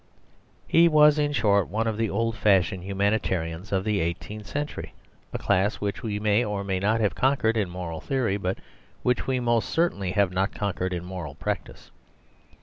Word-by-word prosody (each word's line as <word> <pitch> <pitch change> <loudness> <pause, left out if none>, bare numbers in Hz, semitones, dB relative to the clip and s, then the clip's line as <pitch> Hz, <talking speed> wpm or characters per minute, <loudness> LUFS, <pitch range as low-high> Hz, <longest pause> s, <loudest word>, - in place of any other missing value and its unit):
He 170 +1 +5
was, 150 -1 +6
in 145 0 +1
short, 105 -7 +2
one 110 +3 -1
of 110 -1 -1
the 110 0 0
old 115 +2 -1
fashioned 95 -4 +2
humanitarians 95 -3 -1
of 95 -1 +1
the 105 -1 0
eighteenth 100 +5 -4
century, 145 +1 -5 0.4
a - - -3
class 95 +3 +1
which 100 -1 -3
we 105 -3 -3
may 105 +2 +2
or 105 -3 -3
may 95 -1 -1
not 105 +4 +1
have 105 - +1
conquered 130 -4 +2
in 105 -5 0
moral 85 -3 -6
theory, 125 -7 0
but 95 -1 -2 0.5
which 125 0 +1
we 130 -1 +1
most 120 -2 +1
certainly 100 - 0
have 100 -2 +2
not 95 +2 0
conquered 95 -2 -2
in 90 -1 -4
moral 90 -6 -6
practice. - - -5
105 Hz, 180 wpm, -26 LUFS, 95-115 Hz, 0.5 s, was